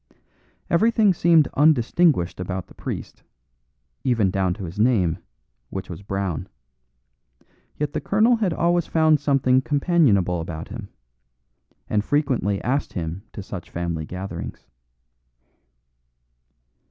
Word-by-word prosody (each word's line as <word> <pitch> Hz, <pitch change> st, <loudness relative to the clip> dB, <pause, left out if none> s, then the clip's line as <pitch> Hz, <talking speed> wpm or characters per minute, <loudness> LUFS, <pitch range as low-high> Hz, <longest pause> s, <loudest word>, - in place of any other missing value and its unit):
Everything 215 Hz, +2 st, +3 dB
seemed 165 Hz, -3 st, +4 dB
undistinguished 145 Hz, -, +3 dB
about 90 Hz, -1 st, -4 dB
the -, -, -18 dB
priest, -, -, -6 dB, 0.8 s
even 115 Hz, -8 st, +2 dB
down 95 Hz, -2 st, +1 dB
to 100 Hz, -, -8 dB
his 90 Hz, +3 st, -7 dB
name, 105 Hz, -8 st, +2 dB, 0.5 s
which 95 Hz, -1 st, -6 dB
was 85 Hz, -, -8 dB
Brown; 95 Hz, -4 st, -3 dB, 1.3 s
yet 150 Hz, -1 st, -2 dB
the -, -, -2 dB
colonel 225 Hz, +4 st, +3 dB
had 205 Hz, -5 st, 0 dB
always 170 Hz, +1 st, +1 dB
found 155 Hz, -2 st, +3 dB
something 135 Hz, -2 st, +3 dB
companionable 130 Hz, -, +2 dB
about 80 Hz, 0 st, -6 dB
him, 105 Hz, -2 st, -8 dB, 1.0 s
and 105 Hz, -1 st, 0 dB
frequently 125 Hz, -, 0 dB
asked 135 Hz, +3 st, -1 dB
him 85 Hz, +1 st, -4 dB
to 100 Hz, -, -7 dB
such 95 Hz, -3 st, -8 dB
family 85 Hz, -2 st, -3 dB
gatherings. 90 Hz, +1 st, -7 dB
110 Hz, 115 wpm, -23 LUFS, 90-155 Hz, 1.3 s, seemed